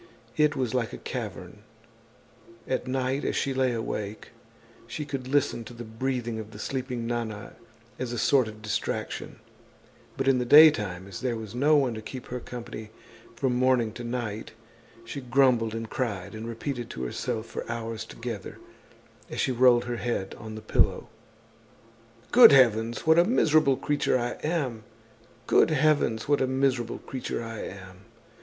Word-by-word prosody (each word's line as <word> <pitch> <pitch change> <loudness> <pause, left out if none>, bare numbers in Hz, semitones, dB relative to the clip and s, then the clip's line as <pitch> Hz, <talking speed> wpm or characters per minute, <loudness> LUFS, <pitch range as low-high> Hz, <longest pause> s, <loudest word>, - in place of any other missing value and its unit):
It 150 0 +3
was 125 -4 -1
like 125 -3 -1
a - - -5
cavern. - - -6 1.1
At 130 -1 -2
night, 130 +2 -1
as - - -1
she 135 - 0
lay 130 -1 +2
awake, 110 -2 -4 0.6
she 150 - -5
could 135 -3 -5
listen 140 -3 +1
to 120 - -10
the 120 - -7
breathing 120 0 -3
of 110 -1 -7
the 110 - -12
sleeping 125 0 -3
Nana 115 -3 -4 0.5
as 130 -2 -3
a 120 - -3
sort 130 +1 +3
of 110 0 -10
distraction; 110 0 -3 0.8
but - - -1
in 135 -2 +4
the - - +1
day 150 +5 +9
time, 95 -6 -5
as 100 - -8
there 125 -2 -1
was 110 -3 -7
no 145 +5 +3
one 135 -5 +2
to 110 - -6
keep 125 +3 -8
her 125 - -4
company 120 -3 -8 0.5
from 130 +1 0
morning 125 -3 +2
to 120 - -7
night, 115 -3 -4 0.5
she 125 +5 -6
grumbled 125 -3 +2
and 115 0 -4
cried 105 -7 -3
and 110 +1 -6
repeated 120 +1 -4
to 65 - -6
herself 110 - -3
for - - -6
hours 115 -1 -4
together, 115 -3 -7 0.7
as - - -5
she 130 - +1
rolled 125 -1 +5
her 120 -1 -3
head 115 -5 -2
on 110 -1 -8
the 110 - -7
pillow: 110 - +1 1.2
"Good 240 -2 +10
heavens! 115 -3 +4
What 160 +1 +6
a - - +7
miserable 155 - +3
creature 145 -3 +1
I 120 0 -1
am! 145 -9 -1 0.6
Good - - +4
heavens! 150 -7 +2
What 145 -1 +2
a 130 - +2
miserable 130 -3 0
creature 130 -2 -5
I 115 -1 -6
am! 95 -1 -8
120 Hz, 165 wpm, -27 LUFS, 110-130 Hz, 1.2 s, Good